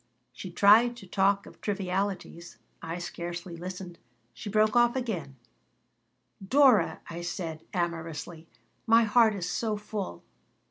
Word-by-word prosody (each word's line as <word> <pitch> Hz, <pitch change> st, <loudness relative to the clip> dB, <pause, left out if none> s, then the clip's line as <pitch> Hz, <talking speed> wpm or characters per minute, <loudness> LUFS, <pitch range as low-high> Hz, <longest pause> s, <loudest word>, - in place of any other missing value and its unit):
She 185 Hz, -, -8 dB
tried 220 Hz, +7 st, +5 dB
to 230 Hz, -, -11 dB
talk 195 Hz, +2 st, +1 dB
of -, -, -15 dB
trivialities. 190 Hz, -, -3 dB, 0.2 s
I 165 Hz, +1 st, -5 dB
scarcely 175 Hz, 0 st, -6 dB
listened. 180 Hz, 0 st, -8 dB, 0.3 s
She 160 Hz, -, -7 dB
broke 215 Hz, +2 st, +2 dB
off 240 Hz, 0 st, +4 dB
again 185 Hz, -, -3 dB, 1.1 s
"Dora!" 250 Hz, -, +4 dB
I 170 Hz, +1 st, -6 dB
said, 165 Hz, -2 st, -5 dB
amorously. 165 Hz, -2 st, -4 dB, 0.4 s
"My 230 Hz, +1 st, +6 dB
heart 220 Hz, 0 st, +4 dB
is 180 Hz, -3 st, -4 dB
so 210 Hz, +4 st, -1 dB
full." 205 Hz, -, -6 dB
190 Hz, 125 wpm, -28 LUFS, 170-215 Hz, 1.1 s, My